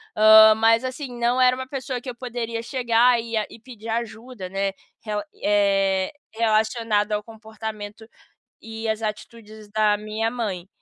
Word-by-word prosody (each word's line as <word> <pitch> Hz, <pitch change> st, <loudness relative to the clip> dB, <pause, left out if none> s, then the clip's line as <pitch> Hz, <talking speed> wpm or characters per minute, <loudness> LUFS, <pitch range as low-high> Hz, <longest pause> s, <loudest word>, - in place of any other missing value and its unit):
hã, 220 Hz, 0 st, +8 dB
mas 225 Hz, +2 st, +3 dB
assim, 255 Hz, -1 st, -6 dB
não 240 Hz, +2 st, +2 dB
era 250 Hz, 0 st, +5 dB
uma 260 Hz, 0 st, -6 dB
pessoa 260 Hz, -2 st, -4 dB
que 255 Hz, -, -8 dB
eu 245 Hz, -, -7 dB
poderia 235 Hz, -2 st, -5 dB
chegar 240 Hz, -1 st, +3 dB
e 230 Hz, 0 st, -7 dB
ia 215 Hz, -1 st, +1 dB
e -, -, -13 dB
pedir 230 Hz, -1 st, -11 dB
ajuda, 230 Hz, -2 st, -5 dB
né. 195 Hz, +1 st, -1 dB, 0.3 s
Rela 210 Hz, -2 st, -3 dB
e -, -, -25 dB
eh, 195 Hz, -2 st, +2 dB, 0.2 s
relacionado 220 Hz, -1 st, +1 dB
ao 210 Hz, 0 st, 0 dB
comportamento 220 Hz, -1 st, -8 dB, 0.5 s
e 225 Hz, 0 st, -5 dB
às 220 Hz, 0 st, -1 dB
atitudes 215 Hz, 0 st, -7 dB
da 215 Hz, -1 st, +3 dB
minha 215 Hz, +2 st, -2 dB
mãe. 205 Hz, -7 st, -4 dB
220 Hz, 160 wpm, -23 LUFS, 210-235 Hz, 0.5 s, hã